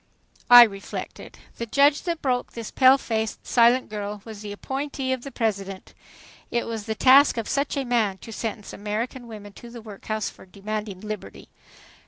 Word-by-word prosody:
'' - - -30
I 245 0 +12
reflected. 200 -3 -6 0.2
The 235 - -4
judge 280 +5 +4
that 340 -2 -3
broke 250 -2 -1
this 230 -2 -7
pale 260 0 +6
faced, 220 -4 -3
silent 240 +2 +4
girl 205 -1 -6
was 220 -2 -9
the 210 -1 -7
appointee 270 +4 -3
of 260 - -4
the 275 - -7
President. 200 -5 -3 0.6
It 235 - -1
was 225 -1 -5
the 220 - -2
task 270 +3 +6
of 230 - -3
such 280 +1 -1
a 275 - -1
man 225 -6 +1
to 225 +3 -11
sentence 215 -2 -5
American 230 +5 -4
women 205 -3 -10
to 240 - -12
the 235 0 -10
workhouse 215 0 -5
for - - -11
demanding 205 0 -6
liberty. 210 - -8
225 Hz, 180 wpm, -24 LUFS, 210-255 Hz, 0.6 s, I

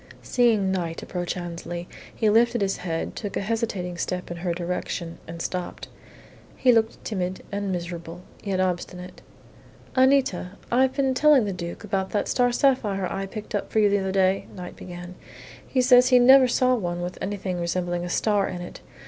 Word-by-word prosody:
Seeing 225 -6 +2
Knight 170 -3 -3
approach 175 0 -3
Annesley, 175 0 -6 0.3
he 220 - +1
lifted 235 +3 +4
his 195 -1 0
head, 165 -2 -3
took 205 -3 -4
a - - -1
hesitating 200 -5 -2
step 180 0 -3
in 175 - -5
her 175 0 -2
direction, 170 -1 -4
and 165 +1 -7
stopped. 180 -1 -5 0.7
He 255 - +5
looked 225 -1 +1
timid 185 -3 -3
and 200 -1 -2
miserable, 175 -1 -5 0.2
yet 195 -2 -1
obstinate. 180 0 -3 0.7
"Anita, 260 -9 +3 0.2
I've 260 +2 +3
been 270 -2 +2
telling 290 -3 +5
the 200 - -2
Duke 170 +1 -6
about 195 -2 -1
that 205 - 0
star 245 -1 +2
sapphire 240 -7 +2
I 195 0 -3
picked 215 +2 -8
up 205 - -2
for - - -2
you 210 -1 +5
the 205 - +3
other 190 0 -2
day," 190 0 +2
Knight 180 -1 -8
began. 175 0 -9 0.5
"He 255 -2 +1
says 250 0 +7
he 255 -1 +6
never 260 +1 +7
saw 255 +1 +3
one 175 -7 -2
with 180 +1 -5
anything 190 -2 -3
resembling 175 0 -1
a 175 - -4
star 205 +1 +1
in 180 - -5
it. 175 - -9
190 Hz, 180 wpm, -25 LUFS, 175-230 Hz, 0.7 s, says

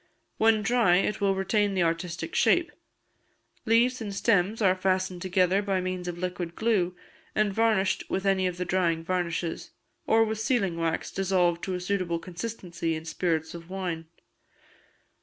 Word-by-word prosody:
When 220 -1 +4
dry, 225 -5 +4
it 205 +3 0
will 195 -1 +2
retain 200 +1 +1
the 180 - +2
artistic 170 - -2
shape. - - +3 1.0
Leaves 240 +3 +3
and 210 -2 -4
stems 200 0 +2
are 195 -4 +4
fastened 185 -1 -1
together 185 +1 +2
by 195 -2 0
means 185 -1 -3
of 175 -1 -4
liquid 180 -1 -4
glue, 195 -6 +1 0.4
and 215 -2 +2
varnished 215 -3 +1
with 190 +1 -2
any 190 -1 +2
of 180 -1 -4
the 180 - -2
drying 170 -2 +1
varnishes, 170 -1 -2 0.4
or 225 0 +5
with 220 0 -3
sealing 220 -6 +1
wax 165 -1 -2
dissolved 180 -3 +1
to 185 - -2
a - - -3
suitable 180 -2 -1
consistency 175 -2 -4
in 160 0 -7
spirits 165 -1 -1
of 170 0 -10
wine. 180 -4 -4
185 Hz, 160 wpm, -27 LUFS, 175-205 Hz, 1.0 s, or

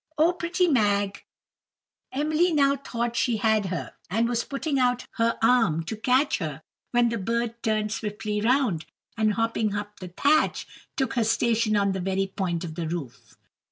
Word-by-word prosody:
Oh, 325 +4 +4
pretty 355 +1 0
Mag!" 205 - +1 0.9
Emily 310 +5 +1
now 280 -3 +3
thought 240 -4 -3
she 235 -1 +1
had 215 -2 +2
her, 180 -1 -4 0.2
and 225 +6 +1
was 235 0 0
putting 280 0 -2
out 250 -1 +1
her 230 0 +1
arm 225 -9 +3
to 220 - -5
catch 255 +6 +2
her 155 -3 -5 0.3
when 240 -1 +3
the 230 -2 -2
bird 235 +3 -2
turned 215 -1 0
swiftly 210 -1 -3
round, 235 - +1 0.3
and 215 -2 +2
hopping 225 -2 0
up 205 0 -5
the 185 - -7
thatch, 285 - +2 0.3
took 265 -4 0
her 240 - +1
station 225 -1 +2
on 200 -1 +2
the 190 - -3
very 190 +1 0
point 185 -3 -3
of 165 -2 -5
the 165 0 -4
roof. 160 -7 -7
225 Hz, 170 wpm, -26 LUFS, 200-250 Hz, 0.9 s, Oh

